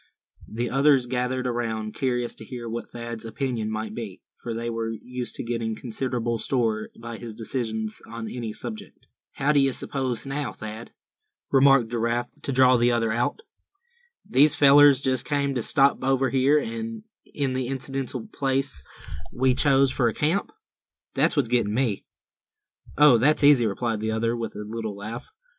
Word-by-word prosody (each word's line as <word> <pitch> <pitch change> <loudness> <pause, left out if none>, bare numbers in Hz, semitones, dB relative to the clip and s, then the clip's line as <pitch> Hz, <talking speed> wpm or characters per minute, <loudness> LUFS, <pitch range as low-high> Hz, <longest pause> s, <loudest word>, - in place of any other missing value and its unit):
The 120 +2 -3
others 135 -1 +4
gathered 125 +1 -2
around, 115 -3 -2
curious 125 -3 -1
to - - -11
hear 120 +1 -7
what 115 +1 -5
Thad's 115 -1 -6
opinion 115 -1 -3
might 110 0 -4
be; 110 -5 -7 0.2
for 120 - -5
they 115 +1 -3
were 115 -1 -2
used 125 +2 -6
to - - -5
setting 115 -2 -2
considerable 120 -1 -3
store 110 -4 -1
by 115 0 -7
his 115 -2 -8
decisions 110 -2 -3
on 115 -1 -6
any 115 -2 -5
subject. 215 - -8 0.3
"How 140 +2 +1
d'ye 140 -2 +4
s'pose 130 -2 -2
now, 135 0 -3
Thad," 110 +2 -8 0.6
remarked 135 -4 +5
Giraffe, 120 +1 -1
to - - -3
draw 130 -1 +5
the 120 +1 +3
other 115 -2 +1
out, 120 - -1 0.8
"these 145 +3 +4
fellers 140 -1 +7
just 130 -2 +1
came 140 0 0
to 125 - -1
stop 135 +5 +3
over 135 0 +2
here, 135 +3 +3
in 225 +4 -4 0.5
the 130 -1 -2
identical 135 - -4
place 135 - -1 0.5
we 130 +1 +2
chose 135 0 +4
for 125 -2 +1
a 115 - -1
camp? 165 +7 0 0.6
That - - +1
what's 140 -5 +2
getting 115 -3 +1
me." 120 -6 0 0.9
"Oh 145 -5 +7
that's 150 +4 +3
easy," 140 -5 +6
replied 110 +2 -2
the 110 +1 -2
other, 115 +1 0
with 115 -2 -5
a 105 0 -6
little 110 -2 -5
laugh. 110 +4 -7
120 Hz, 160 wpm, -25 LUFS, 115-135 Hz, 0.9 s, fellers